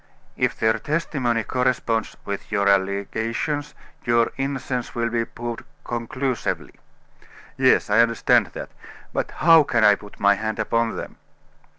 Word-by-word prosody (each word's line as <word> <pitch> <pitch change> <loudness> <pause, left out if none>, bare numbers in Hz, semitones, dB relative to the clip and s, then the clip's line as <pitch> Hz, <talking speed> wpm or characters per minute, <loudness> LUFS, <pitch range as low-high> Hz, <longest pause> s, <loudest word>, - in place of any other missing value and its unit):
"If - - 0
their 110 0 +2
testimony 135 -7 -1
corresponds 125 -3 -1
with 100 +2 -5
your 100 -1 +1
allegations, 110 +9 0 0.3
your 115 -1 +2
innocence 135 -2 -3
will 115 0 -1
be 115 -1 0
proved 120 0 -6 0.2
conclusively." 120 +2 -3 0.8
"Yes, - - +3
I 105 +2 +3
understand 115 -1 +4
that; - - -7 0.4
but - - -1
how 165 0 +6
can 120 -6 +1
I 105 -1 +7
put 105 0 -9
my 100 0 +5
hand 110 +1 -3
upon 115 0 0
them?" - - -7
115 Hz, 130 wpm, -23 LUFS, 110-130 Hz, 0.8 s, I